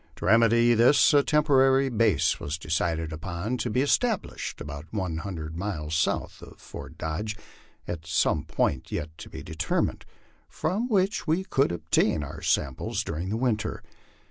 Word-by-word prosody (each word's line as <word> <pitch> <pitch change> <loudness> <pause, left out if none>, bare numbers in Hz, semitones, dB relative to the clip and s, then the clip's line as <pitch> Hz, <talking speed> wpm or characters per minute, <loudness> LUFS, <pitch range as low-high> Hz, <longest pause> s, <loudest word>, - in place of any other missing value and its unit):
To - - -7
remedy 115 +2 +5
this 120 +7 +5
a 145 - +6
temporary 135 -3 +4
base 105 - +2
was 75 +3 -3
decided 80 0 -1
upon, 90 +8 -3
to 120 - -2
be 125 +4 +1
established 220 - -1
about 75 +1 -7
one 95 -6 -2
hundred 80 -4 -5
miles 85 -5 -4
south 80 - -1
of - - -13
Fort - - -10
Dodge, 105 +8 -3 0.5
at 80 -2 -5
some 75 - +1
point 75 -4 -1
yet 80 +1 -4
to - - -9
be - - -8
determined, 80 0 -1 0.4
from 215 +7 -1
which 195 -3 +1
we 165 +4 +1
could 135 - +1
obtain 80 -2 +1
our 70 - -8
supplies 70 -2 -1
during 85 +5 -4
the 110 - -1
winter. 110 -4 -1
100 Hz, 155 wpm, -27 LUFS, 80-130 Hz, 0.5 s, a